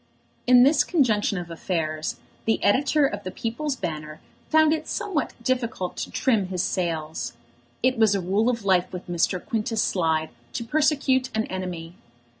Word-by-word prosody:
In 250 Hz, 0 st, +8 dB
this 285 Hz, +2 st, +5 dB
conjunction 220 Hz, -, +2 dB
of 175 Hz, -1 st, -6 dB
affairs 160 Hz, -2 st, -2 dB, 0.3 s
the 225 Hz, -, +1 dB
editor 280 Hz, +7 st, +3 dB
of 275 Hz, -, -3 dB
The 185 Hz, -, -4 dB
People's 250 Hz, +9 st, -3 dB
Banner 155 Hz, -6 st, -5 dB, 0.3 s
found 315 Hz, 0 st, +5 dB
it 315 Hz, 0 st, -3 dB
somewhat 340 Hz, -7 st, -2 dB
difficult 235 Hz, -7 st, -1 dB
to -, -, -4 dB
trim 225 Hz, -8 st, +1 dB
his 185 Hz, -1 st, -2 dB
sails. 160 Hz, -8 st, -2 dB, 0.5 s
It 255 Hz, -1 st, +2 dB
was 215 Hz, -2 st, +5 dB
a -, -, +1 dB
rule 195 Hz, +6 st, +1 dB
of 230 Hz, -4 st, -2 dB
life 185 Hz, -2 st, +3 dB
with 180 Hz, 0 st, -7 dB
Mr. 175 Hz, +1 st, +1 dB
Quintus 220 Hz, +2 st, -1 dB
Slide 160 Hz, -3 st, 0 dB, 0.2 s
to 235 Hz, -, -3 dB
persecute 270 Hz, -1 st, +2 dB
an 220 Hz, -, +2 dB
enemy. 180 Hz, -3 st, -5 dB
210 Hz, 160 wpm, -25 LUFS, 175-255 Hz, 0.5 s, In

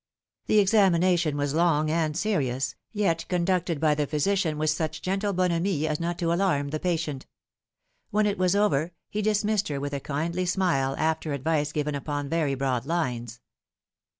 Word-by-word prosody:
The 215 Hz, -, +3 dB
examination 185 Hz, -6 st, +3 dB
was 145 Hz, -1 st, -1 dB
long 155 Hz, -2 st, +2 dB
and 160 Hz, -1 st, 0 dB
serious, 135 Hz, -, 0 dB, 0.2 s
yet 195 Hz, -6 st, 0 dB
conducted 180 Hz, -2 st, 0 dB
by 155 Hz, -1 st, +3 dB
the 150 Hz, -1 st, -1 dB
physician 160 Hz, +1 st, 0 dB
with 155 Hz, 0 st, +1 dB
such 160 Hz, 0 st, -3 dB
gentle 195 Hz, +2 st, 0 dB
bonhomie 175 Hz, -3 st, 0 dB
as 150 Hz, -1 st, -1 dB
not 170 Hz, +1 st, -2 dB
to 170 Hz, -1 st, 0 dB
alarm 170 Hz, -6 st, +1 dB
the 155 Hz, +2 st, -3 dB
patient. 160 Hz, -6 st, -2 dB, 0.8 s
When 210 Hz, +1 st, +2 dB
it 205 Hz, -1 st, 0 dB
was 185 Hz, +1 st, +2 dB
over, 175 Hz, -5 st, +1 dB, 0.2 s
he 210 Hz, -, -1 dB
dismissed 210 Hz, 0 st, +1 dB
her 145 Hz, -2 st, -3 dB
with 145 Hz, +1 st, -4 dB
a 140 Hz, -, -1 dB
kindly 170 Hz, +6 st, -2 dB
smile, 165 Hz, -8 st, +1 dB
after 160 Hz, -1 st, 0 dB
advice 150 Hz, +1 st, 0 dB
given 150 Hz, 0 st, -2 dB
upon 145 Hz, 0 st, -3 dB
very 155 Hz, -4 st, 0 dB
broad 130 Hz, -2 st, -1 dB
lines. 120 Hz, -8 st, -2 dB
160 Hz, 165 wpm, -26 LUFS, 145-185 Hz, 0.8 s, The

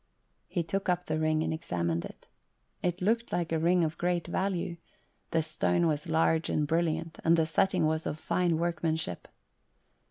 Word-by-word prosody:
He 175 Hz, -, -1 dB
took 195 Hz, +4 st, -2 dB
up 180 Hz, 0 st, +1 dB
the 155 Hz, 0 st, -1 dB
ring 155 Hz, 0 st, +2 dB
and -, -, -1 dB
examined 85 Hz, -, -2 dB
it. -, -, -12 dB, 0.5 s
It 180 Hz, 0 st, -1 dB
looked 230 Hz, +4 st, +1 dB
like 170 Hz, -2 st, -1 dB
a 160 Hz, -, +1 dB
ring 175 Hz, +2 st, +3 dB
of 160 Hz, 0 st, -2 dB
great 175 Hz, -1 st, 0 dB
value; 175 Hz, -1 st, -1 dB, 0.5 s
the 165 Hz, -1 st, +1 dB
stone 160 Hz, +2 st, +1 dB
was 155 Hz, 0 st, 0 dB
large 160 Hz, 0 st, +2 dB
and 150 Hz, -, +1 dB
brilliant, 165 Hz, +1 st, -1 dB
and 165 Hz, +1 st, +5 dB
the 160 Hz, -, +3 dB
setting 175 Hz, +2 st, +2 dB
was 155 Hz, +1 st, 0 dB
of 150 Hz, -, -3 dB
fine 175 Hz, 0 st, +1 dB
workmanship. 160 Hz, -, -2 dB
165 Hz, 170 wpm, -30 LUFS, 155-175 Hz, 0.5 s, and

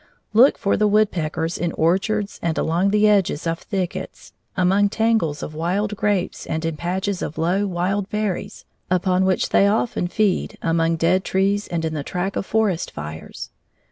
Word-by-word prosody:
Look 245 Hz, +6 st, +6 dB
for 200 Hz, -, +1 dB
the 210 Hz, -, +3 dB
woodpeckers 175 Hz, -6 st, 0 dB
in 175 Hz, -2 st, -1 dB
orchards 195 Hz, +5 st, 0 dB
and 165 Hz, -1 st, -1 dB
along 175 Hz, +5 st, +1 dB
the 210 Hz, +1 st, +4 dB
edges 195 Hz, -7 st, +2 dB
of 165 Hz, 0 st, -1 dB
thickets, 190 Hz, -3 st, -5 dB, 0.2 s
among 195 Hz, +3 st, +3 dB
tangles 220 Hz, -10 st, 0 dB
of 155 Hz, -, -6 dB
wild 190 Hz, +7 st, -1 dB
grapes 200 Hz, -3 st, -1 dB
and 160 Hz, +1 st, -2 dB
in 165 Hz, -1 st, -1 dB
patches 185 Hz, +4 st, -2 dB
of 155 Hz, -, -4 dB
low, 180 Hz, +5 st, +1 dB
wild 190 Hz, +2 st, -1 dB
berries, 210 Hz, -3 st, -3 dB, 0.2 s
upon 185 Hz, +1 st, +2 dB
which 190 Hz, -1 st, +1 dB
they 200 Hz, -, +4 dB
often 215 Hz, -3 st, 0 dB
feed, 200 Hz, 0 st, 0 dB
among 165 Hz, 0 st, +2 dB
dead 170 Hz, +3 st, +2 dB
trees 200 Hz, +2 st, 0 dB
and 165 Hz, -1 st, -2 dB
in 160 Hz, -, -2 dB
the 150 Hz, -, -2 dB
track 180 Hz, +6 st, -3 dB
of -, -, -3 dB
forest 210 Hz, -6 st, 0 dB
fires. 75 Hz, +2 st, -8 dB
185 Hz, 170 wpm, -22 LUFS, 165-205 Hz, 0.2 s, Look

